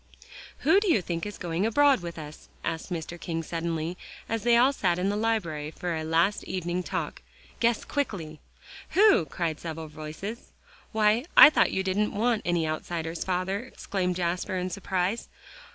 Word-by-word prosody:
"Who 390 - +5
do 405 -3 +1
you 315 - +4
think 170 +1 -3
is 205 - -7
going 170 +1 -2
abroad 275 +4 +4
with 170 -1 -7
us?" 150 -1 -10
asked 165 +2 -4
Mr. 170 0 -5
King 165 -1 -3
suddenly, 165 +1 -3 0.3
as 225 -1 -2
they 235 +1 +4
all 260 +4 +5
sat 180 -9 +1
in 185 +2 0
the 205 - 0
library 195 -9 -1
for 170 +2 -4
a 160 - -3
last 165 +6 +2
evening 180 -1 -2
talk; - - -4 0.4
"guess 235 -1 +2
quickly." 175 - -3 0.6
"Who?" 410 - +6
cried 160 +1 -2
several 160 -1 -6
voices. 155 +9 -7 0.4
"Why, 220 +3 +3
I 300 - +12
thought - - +3
you 190 - 0
didn't 200 +3 0
want 225 +1 +1
any 175 -2 +1
outsiders, 160 +1 -3
father," 185 +2 -1
exclaimed 195 -6 -3
Jasper 180 +1 -1
in 180 0 -2
surprise. 190 +2 -2
180 Hz, 170 wpm, -27 LUFS, 165-210 Hz, 0.6 s, I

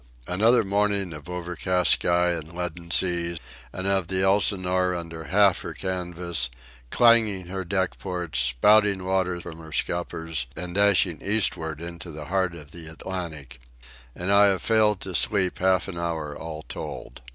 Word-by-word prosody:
Another 110 +6 +3
morning 100 -2 0
of 75 +2 -10
overcast 90 +1 0
sky 90 0 +3
and 85 0 -6
leaden 90 -1 -5
sea, 85 -1 +2 0.3
and 95 - -6
of 95 -3 +2
the 95 0 0
Elsinore, 95 -2 +2
under 85 -2 -7
half 100 -1 +3
her 80 - -7
canvas, 90 -6 -1 0.4
clanging 110 - +4
her 95 0 -4
deck 95 0 -1
ports, 90 -6 -3
spouting 95 - +3
water 95 -2 0
from 80 -1 -9
her 80 -1 -11
scuppers, 80 -5 -2
and 85 +2 -5
dashing 100 -4 +3
eastward 80 -7 0
into 85 +1 -8
the 75 -2 -8
heart 95 0 -1
of 75 -3 -12
the 85 -2 -10
Atlantic. 80 -6 -7 0.6
And 90 +3 -2
I 100 0 +6
have 95 -3 0
failed 105 -3 +3
to 95 - -6
sleep 95 +1 +1
half 95 0 +2
an 90 -3 -6
hour 80 -3 -3
all 80 -1 -7
told. - - -8
90 Hz, 155 wpm, -25 LUFS, 85-95 Hz, 0.6 s, I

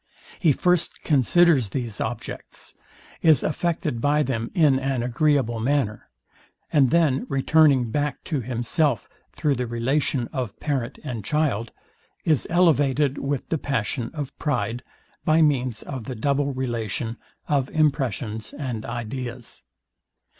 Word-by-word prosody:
He 165 -5 +4
first 180 +4 +1
considers 150 - +4
these 115 -1 -4
objects; 110 0 -6 0.5
is 160 -3 +5
affected 155 -7 -1
by 150 +2 +3
them 115 -4 -2
in 145 -6 +4
an 135 -2 -1
agreeable 125 -2 +1
manner; 120 -3 -1 0.6
and 140 -4 +5
then 145 -4 +2
returning 135 -3 +3
back 145 +1 -2
to 150 -7 -2
himself, 120 - 0 0.2
through 150 - 0
the 125 -2 -2
relation 120 +2 0
of 125 -6 -4
parent 135 -4 -2
and 120 -7 -5
child, 125 -4 0 0.5
is 155 -5 +2
elevated 145 -5 +3
with 140 -1 -3
the 160 - 0
passion 120 -3 -2
of 145 -3 -5
pride, 120 -5 -1 0.4
by 160 +1 +4
means 130 -7 +1
of 130 -5 -6
the 130 - -5
double 140 +4 0
relation, 120 -3 -3 0.3
of 140 -3 +1
impressions 125 -8 -1
and 125 -6 -4
ideas. 120 +1 -6
135 Hz, 125 wpm, -24 LUFS, 120-150 Hz, 0.6 s, is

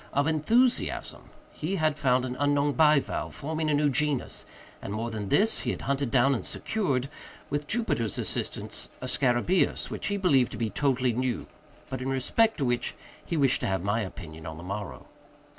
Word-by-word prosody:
—of 140 +1 +2
enthusiasm. 225 - +1 0.2
He 170 +6 -3
had 155 -4 +1
found 130 -3 +2
an 125 0 -4
unknown 145 0 +2
bivalve, 150 -2 +2
forming 155 +1 -2
a - - +2
new 145 +1 +3
genus, 145 -1 0 0.3
and, - - -6
more 115 +3 -3
than 105 -3 -4
this, 215 - +3
he - - -2
had - - -3
hunted 140 -1 0
down 135 +3 +4
and 120 - -2
secured, 140 - -1 0.4
with 145 +1 -2
Jupiter's 175 - 0
assistance, - - -3
a - - -6
scarabæus 130 +7 +1
which - - -3
he 205 - 0
believed 140 -10 +3
to - - -5
be 110 -1 -1
totally 130 -3 +1
new, 125 -1 -1 0.4
but 130 -1 -5
in 130 - -2
respect 175 - +2
to 140 - 0
which 120 -1 -1 0.3
he 165 - -3
wished 140 -2 +4
to 120 - -2
have 95 -3 -1
my 105 +3 +1
opinion 85 -5 -8
on 80 0 -6
the 85 - -9
morrow. 95 -8 -6
135 Hz, 185 wpm, -28 LUFS, 120-150 Hz, 0.4 s, down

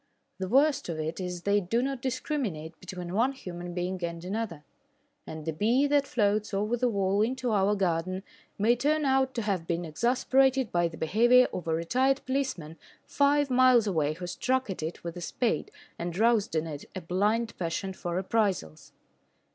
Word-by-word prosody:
The 190 - -2
worst 275 +1 +3
of 160 -2 -3
it 160 +3 -3
is 180 -1 -5
they 205 +1 +2
do 200 +6 0
not 270 -2 -3
discriminate 235 - -3
between 180 -1 -7
one 240 +7 +2
human 175 -7 -7
being 180 0 -3
and 170 0 -4
another, 190 -6 -4 0.6
and 155 -1 -7
the 160 - -2
bee 235 - +2
that 285 -1 +2
floats 210 -2 0
over 210 +4 0
the 245 +1 +1
wall 200 -1 +1
into 250 +2 0
our 205 0 +2
garden 185 0 -1 0.3
may 225 +4 +3
turn 300 +4 +1
out 265 -1 +2
to 230 - -1
have 190 -6 -2
been 170 0 -1
exasperated 260 - +2
by 175 -1 +2
the 165 -1 -9
behaviour 240 +10 +5
of 175 - -5
a 160 - +1
retired 260 +11 +1
policeman 255 - -3 0.3
five 285 -1 +2
miles 250 -2 +5
away 155 -7 0
who 180 +3 -7
struck 255 +5 -1
at 185 - -6
it 160 +2 -5
with 170 -1 -5
a - - -6
spade 175 - -1 0.3
and 170 0 -4
roused 220 -5 +2
in 155 0 +1
it 150 -3 -7
a 185 - -4
blind 210 +7 0
passion 185 +3 -2
for 175 -2 -4
reprisals. 190 - -1
200 Hz, 180 wpm, -28 LUFS, 175-250 Hz, 0.6 s, behaviour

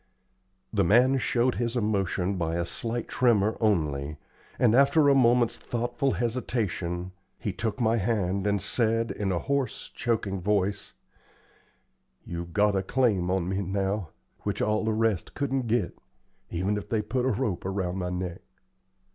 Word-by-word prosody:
The 100 -2 +3
man 125 +8 +4
showed 125 0 +1
his 120 0 -1
emotion 100 -4 0
by 85 -2 -1
a 85 0 0
slight 115 +6 -3
tremor 110 -4 +2
only, 75 -8 0 0.4
and 115 -3 +4
after 140 +4 +5
a - - +6
moment's 120 -3 +3
thoughtful 120 +3 -1
hesitation 95 -7 -2 0.3
he 100 - -3
took 110 +6 -3
my 115 -1 +2
hand 100 -2 0
and 100 0 +2
said, 115 +3 0
in 100 -2 -2
a 90 - +1
hoarse, 140 +6 -2
choking 105 -5 -1
voice: 100 0 0 1.3
"You've 85 0 -6
got 105 +3 +3
a 95 - +2
claim 100 -4 +1
on 95 -2 0
me 95 +1 -1
now 95 -1 -1 0.3
which - - -3
all 105 0 +1
the 110 - +1
rest 110 -4 0
couldn't 135 -3 -1
git, 110 -5 0 0.5
even 95 +4 -1
if 105 - -7
they 110 -2 0
put 125 +4 -1
a 130 - +2
rope 110 -5 -1
around 95 -1 -2
my 90 -1 -2
neck. 90 -1 -4
105 Hz, 155 wpm, -27 LUFS, 95-120 Hz, 1.3 s, a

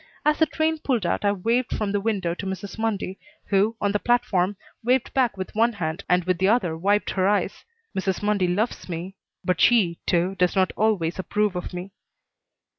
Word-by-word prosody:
As 300 0 +3
the 320 - +5
train 315 +2 0
pulled 245 -10 0
out 170 - 0
I 205 - +3
waved 230 +6 0
from 210 -2 -1
the 205 0 0
window 195 -6 0
to 195 +3 -6
Mrs. 190 +3 -6
Mundy, 205 -4 -2 0.3
who, 205 +3 +2
on 205 - +1
the 205 - 0
platform, 200 -6 +1 0.3
waved 250 +2 +1
back 245 -6 +2
with 185 - -5
one 230 +2 +3
hand 160 -5 -3
and 180 0 +3
with 180 -1 0
the 190 - +3
other 200 -7 +2
wiped 200 +5 +1
her 190 -1 +1
eyes. 205 0 0 0.3
Mrs. 190 0 -1
Mundy 205 -3 +2
loves 200 +3 -1
me, 175 +3 -5 0.3
but 180 -2 +1
she, 195 -9 +4
too, 180 +2 +2
does 180 +1 +2
not 190 -1 +2
always 190 -6 +1
approve 210 +1 0
of 180 - -4
me. 180 +2 -6
200 Hz, 195 wpm, -24 LUFS, 180-220 Hz, 0.3 s, the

